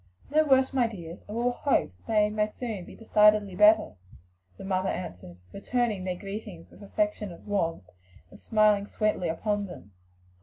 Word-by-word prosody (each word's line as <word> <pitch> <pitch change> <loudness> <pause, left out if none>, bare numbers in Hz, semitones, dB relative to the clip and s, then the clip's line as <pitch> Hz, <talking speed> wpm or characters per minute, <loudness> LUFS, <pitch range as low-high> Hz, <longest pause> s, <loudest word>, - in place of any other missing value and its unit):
"No 310 +1 +4
worse, 265 -2 +3
my 250 -3 +3
dears; 175 -6 -9
and 210 - -5
we 235 - 0
will 245 - +2
hope 245 - 0
that - - -29
they 210 -1 +2
may 210 0 +1
soon 215 -4 -6
be - - -12
decidedly 210 -3 +3
better," 210 - +4 0.6
the - - -10
mother 190 0 -1
answered, 90 - -6 0.2
returning 220 -2 -1
their 180 -1 -2
greetings 195 -3 -8
with - - -16
affectionate 210 - -2
warmth 165 - -2 0.4
and 205 - -14
smiling 210 -2 +2
sweetly 210 -6 -1
upon 205 +4 -1
them. 105 - -12
210 Hz, 165 wpm, -27 LUFS, 185-225 Hz, 0.6 s, No